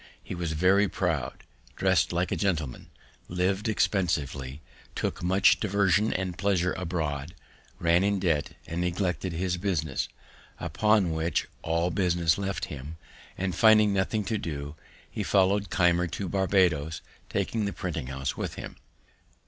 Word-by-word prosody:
He - - -6
was 85 -3 -3
very 95 +5 +4
proud, 80 -10 -2 0.3
dress'd - - +2
like 85 +1 0
a - - +1
gentleman, 80 -10 -2 0.4
liv'd 95 +4 0
expensively, 75 -10 0 0.4
took - - -2
much 95 +3 +4
diversion 100 0 +2
and 95 -1 -3
pleasure 95 -3 +1
abroad, 80 -4 -3 0.4
ran 85 +2 +3
in 100 0 +1
debt, 80 -6 0
and 85 +2 -3
neglected 90 0 -1
his 90 +1 -1
business; 85 -7 -1 0.5
upon 100 +2 +2
which, 80 +1 -1
all 85 +2 0
business 85 -2 +2
left 100 -1 -2
him; 75 +3 -8 0.4
and, 95 -1 -1
finding 110 +2 +5
nothing 100 +2 0
to 110 +1 -2
do, 75 -5 -5 0.3
he - - -5
followed 100 +1 +2
Keimer 85 -1 +3
to 95 +3 -4
Barbadoes, 90 -5 +1 0.3
taking 110 -2 -1
the 100 - -1
printing 80 -9 -4
house 65 0 -3
with - - -4
him. - - -8
90 Hz, 140 wpm, -28 LUFS, 80-100 Hz, 0.5 s, finding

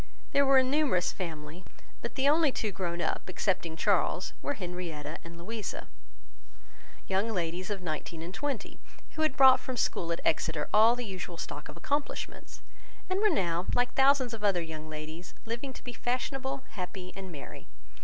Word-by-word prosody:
There 280 0 +4
was 270 -1 +8
a 260 - 0
numerous 270 - +3
family; 160 -1 -6 0.4
but 235 - -5
the 270 +1 +3
only 305 0 +5
two 215 -4 -1
grown 175 -2 -2
up, 160 - -1
excepting 180 -3 0
Charles, 160 - +2
were 285 - -1
Henrietta 175 - -5
and 170 0 -10
Louisa, 215 +5 -5 1.2
young 195 +4 +1
ladies 180 -2 -2
of 200 -3 -3
nineteen 160 0 -4
and 175 +2 -6
twenty, 275 0 -3 0.3
who 315 - -4
had 310 -2 +2
brought 265 -2 +9
from 260 -1 -5
school 170 -5 +1
at 170 - 0
Exeter 160 -1 +1
all 220 +3 +7
the 245 0 -4
usual 185 -3 -5
stock - - -6
of - - -9
accomplishments, 290 0 -3 0.5
and 375 - +2
were 425 +1 +5
now 175 - +1
like 245 0 +2
thousands 270 -2 +4
of 220 -2 -6
other 190 -4 +3
young 155 -1 -7
ladies, 155 +3 -7
living 235 +4 -3
to - - -12
be 245 - -6
fashionable, 265 +3 -2
happy, 185 -2 -6
and 190 -2 -7
merry. 145 -4 -9
195 Hz, 175 wpm, -30 LUFS, 170-260 Hz, 1.2 s, brought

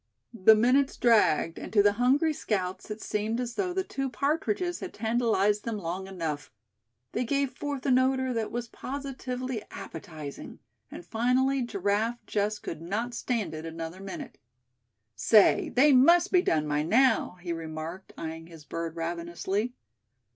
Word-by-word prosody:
The 220 0 +6
minutes 255 +5 +3
dragged, 210 -8 +3
and - - -7
to 205 -2 +6
the 205 - +5
hungry 270 +8 +3
scouts 190 -9 -3
it 210 +1 -6
seemed 215 +3 -1
as 245 -1 -3
though 365 +7 -1
the 380 +1 -1
two 270 -6 -3
partridges 290 - -1
had 370 - -7
tantalized 220 -2 +1
them 230 -2 -3
long 185 +1 -4
enough. 165 -6 -4 0.6
They - - -1
gave 275 +2 0
forth 285 -3 -5
an 255 -2 +5
odor 260 0 +1
that 225 -2 -2
was 240 0 -3
positively 255 -3 -5
appetizing; 155 -3 -8 0.3
and 175 - -9
finally 255 +6 +1
Giraffe 215 +1 0
just 210 0 -1
could 165 - -6
not 215 +8 -3
stand 225 -9 -2
it 155 0 -6
another 165 +2 -6
minute. 195 -1 -8 0.8
"Say, 215 -3 +5
they 280 +4 +5
must 340 +8 +6
be 360 - +5
done 155 - +1
by 150 0 +1
now," 225 - +3
he 175 -1 -3
remarked, 165 +3 -6
eying 165 0 -6
his 165 -3 -13
bird 165 +1 -4
ravenously. 170 +7 -3
220 Hz, 155 wpm, -28 LUFS, 175-255 Hz, 0.8 s, The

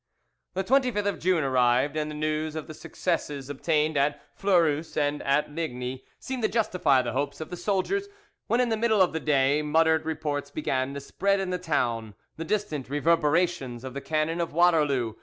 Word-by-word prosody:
"The 190 - 0
25th 250 -2 +2
of 200 - -1
June 180 -3 +2
arrived, 130 +2 +2
and 155 -1 -1
the 150 - -6
news 155 +1 -2
of 155 - -4
the 155 - -9
successes 145 -4 -3
obtained 155 +1 0
at 145 +1 +1 0.2
Fleurus 165 -5 +1
and 145 0 0
at 140 +2 +1
Ligny 130 -5 -4
seemed 260 -1 -5
to 215 - +2
justify 180 - +2
the 120 - -3
hopes 140 +2 -2
of 155 - -7
the - - -3
soldiers, 205 - -1 0.4
when, 235 - +2
in 245 - +1
the 225 - 0
middle 220 -1 +2
of 180 - -1
the 160 - -1
day, 145 -1 +2
muttered 160 +1 +3
reports 150 -3 -2
began 135 -2 -2
to - - -3
spread 195 +8 0
in 190 -1 -2
the 180 - -1
town, 115 - -1 0.2
the 165 - -5
distant 165 -8 -2
reverberations 150 -3 +1
of 130 -1 -6
the 140 - -5
cannon 160 +3 -1
of 165 - -3
Waterloo. 150 -9 +3
155 Hz, 190 wpm, -27 LUFS, 140-180 Hz, 0.4 s, muttered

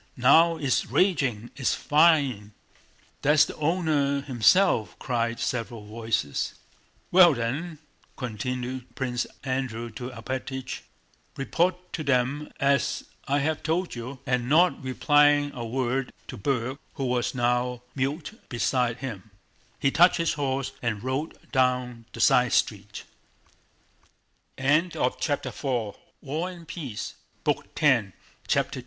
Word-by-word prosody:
Now 165 +7 +5
it's 140 -5 0
raging... 135 - +1
It's 130 - 0
fine!" 145 -10 +3 0.7
"That's 150 +1 +5
the - - -8
owner 150 -3 +1
himself," 135 - +3
cried 115 -2 -1
several 115 -3 -3
voices. 110 -8 -2 0.6
"Well 175 -4 +7
then," 140 +8 -3 0.4
continued 125 +1 -4
Prince 125 -2 -2 0.2
Andrew 130 -3 -3
to 120 +3 -6
Alpátych, 130 +2 -5 0.6
"report 175 +6 -1
to 155 - -3
them 140 +2 0
as 140 0 +1 0.2
I 140 +1 +2
have 160 0 -1
told 170 +3 -1
you"; 125 +3 -6
and 125 -2 0
not 175 +5 +4
replying 145 +2 +3
a 120 - -5
word 130 +2 -1 0.2
to - - -5
Berg 130 +3 -2 0.2
who 135 - -2
was 125 0 0
now 125 0 0
mute 150 - -3
beside 120 +1 0
him, 110 -5 -7 0.5
he 135 - +2
touched 175 +5 +5
his 165 -1 +1
horse 135 -2 -2
and 115 -3 -2
rode 130 +5 -2
down 125 -3 0
the - - -10
side 125 -1 +4
street. 105 -1 -1
130 Hz, 105 wpm, -26 LUFS, 120-145 Hz, 0.7 s, Well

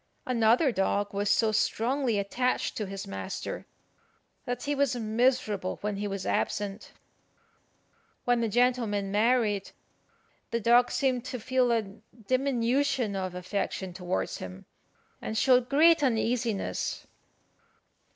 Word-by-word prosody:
Another 245 +3 +3
dog 200 0 0
was 200 0 0
so 220 -2 +3
strongly 235 +3 +1
attached 245 +6 -1
to 210 - -3
his 195 0 -6
master 95 -1 -5 0.8
that 245 0 -3
he 290 - -1
was 280 -3 +1
miserable 220 -4 0
when 210 -1 -2
he 205 +1 -2
was 195 -2 -4
absent. 205 -1 -2 1.3
When 245 -1 +2
the 230 - 0
gentleman 230 -4 +1
married, 210 -2 +2 0.8
the 235 - -1
dog 240 +2 +4
seemed 255 -3 0
to 255 0 -5
feel 255 +1 +1
a 230 -1 +2 0.4
diminution 255 -2 +1
of 185 -2 -3
affection 185 0 -3
towards 180 0 -3
him, 95 0 -8 0.6
and 220 - -4
showed 250 -1 +4
great 320 +3 +5
uneasiness. 235 -4 -1
230 Hz, 120 wpm, -28 LUFS, 200-255 Hz, 1.3 s, great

